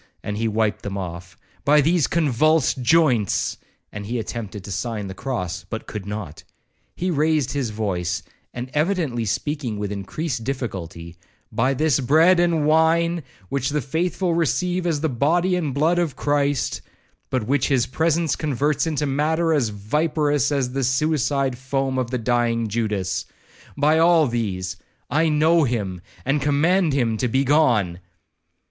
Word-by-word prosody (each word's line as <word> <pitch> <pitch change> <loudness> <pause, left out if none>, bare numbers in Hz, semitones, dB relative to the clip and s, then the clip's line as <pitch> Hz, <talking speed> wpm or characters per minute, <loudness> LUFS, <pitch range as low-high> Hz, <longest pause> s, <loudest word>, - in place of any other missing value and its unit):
and 105 - -3
he 115 - 0
wiped 110 -1 0
them 100 -1 -5
off,—'by 95 - -2
these 160 0 +3
convulsed 155 -2 +2
joints!' 125 - +2 0.3
and 105 -1 -7
he 120 +3 -2
attempted 110 -3 -5
to 100 - -8
sign 105 +3 -3
the 95 - -6
cross, 95 -5 -4
but 110 - -5
could 105 -2 -7
not. 100 -7 -6 0.5
He 185 +1 -1
raised 155 -3 +1
his 135 -5 -1
voice, 90 -5 -2 0.3
and 125 +1 -6
evidently 150 - 0
speaking 130 0 -2
with 105 -1 -3
increased 120 - -4
difficulty,—'By 105 +1 -4
this 150 -1 +2
bread 160 +7 +4
and 170 -3 +2
wine, 165 +2 +3 0.3
which 135 -1 -1
the 150 +1 0
faithful 170 +6 -1
receive 175 +2 0
as 155 -4 0
the 160 - +1
body 165 +8 +1
and 160 -6 -1
blood 160 +6 +2
of 165 -5 -1
Christ, 145 -2 0 0.5
but 130 -4 -1
which 140 +5 +1
his 130 -4 +2
presence 160 +3 +1
converts 150 +1 0
into 150 -2 -1
matter 160 +4 +1
as 135 -7 +1
viperous 145 +7 0
as 135 -3 0
the 135 +1 -2
suicide 135 0 +1
foam 135 0 -1
of 125 -2 -2
the 130 - -1
dying 115 -1 0
Judas,—by 105 - -2
all 165 -1 +5
these—I 115 - -2
know 160 +2 +4
him, 100 -9 -2 0.2
and 140 +2 +1
command 155 +4 +2
him 120 -5 +1
to 125 - 0
be 130 +4 +1
gone! 120 - +2
135 Hz, 145 wpm, -22 LUFS, 110-155 Hz, 0.5 s, all